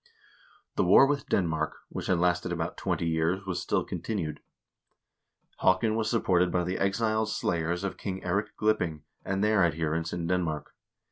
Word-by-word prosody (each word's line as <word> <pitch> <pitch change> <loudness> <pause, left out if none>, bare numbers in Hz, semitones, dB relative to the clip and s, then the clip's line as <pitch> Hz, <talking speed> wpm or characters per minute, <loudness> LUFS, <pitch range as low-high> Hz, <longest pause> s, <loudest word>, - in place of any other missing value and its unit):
The - - +3
war - - +7
with 140 0 -1
Denmark, 80 -4 0
which - - -5
had 90 - +3
lasted 90 0 +1
about 85 -1 -2
twenty - - -1
years, 85 +4 0
was 95 -2 -2
still - - 0
continued. 90 -9 -4 1.2
Haakon 95 +4 +3
was 110 -1 0
supported 90 -6 +2
by 90 - +1
the 90 +2 -2
exiled 110 +2 +1
slayers 85 -2 -1
of 95 -2 -3
King 95 -1 -4
Eirik 100 +4 -1
Glipping 90 -8 +1 0.2
and 95 +1 -1
their 105 -2 +4
adherents 80 0 0
in 85 -1 -3
Denmark. 85 -3 -1
90 Hz, 155 wpm, -28 LUFS, 85-105 Hz, 1.2 s, war